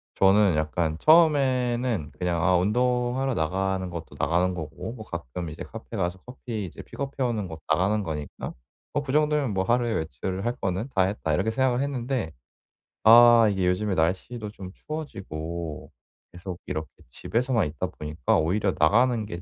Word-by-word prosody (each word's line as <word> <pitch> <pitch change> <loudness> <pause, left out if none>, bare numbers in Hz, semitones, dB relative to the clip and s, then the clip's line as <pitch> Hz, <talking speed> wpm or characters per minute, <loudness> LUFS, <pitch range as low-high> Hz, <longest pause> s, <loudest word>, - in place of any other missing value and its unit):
저는 95 -2 +4
약간 80 +1 -1
처음에는 130 - +3
그냥 85 -2 0
'아 90 +1 +4
운동하러 125 +5 +1
나가는 95 +2 -1
것도 85 -2 -8
나가는 90 +2 +2
거고 80 +7 -6
뭐 110 -3 -9
가끔 85 - -6
이제 80 - -7
카페 115 0 -8
가서 90 0 -1
커피 120 -4 -5
이제 85 - -9
픽업해 140 -1 -5
오는 110 -5 -1
것 80 -2 -8
나가는 95 +6 +2
거니까 75 -4 -5 0.4
뭐 145 - 0
그 130 - -4
정도면 150 -5 +2
뭐 95 0 +1
하루에 120 +2 +1
외출을 90 - -3
할 120 +1 0
거는 95 +7 -2
다 95 - +4
했다.' 95 -5 -1
이렇게 95 +8 +1
생각을 130 +1 +1
했는데 130 - -2 0.7
아 120 0 +8
이게 95 -2 0
요즘에 95 +1 0
날씨도 100 +7 -1
좀 95 -3 -9
추워지고 85 - -6 0.4
계속 90 0 -7
이렇게 80 0 -3 0.2
집에서만 120 - 0
있다 75 -1 -3
보니까 75 -2 -1
오히려 95 +4 +1
나가는 115 +7 +3
게 85 -4 -7
100 Hz, 345 characters per minute, -26 LUFS, 85-120 Hz, 0.7 s, 아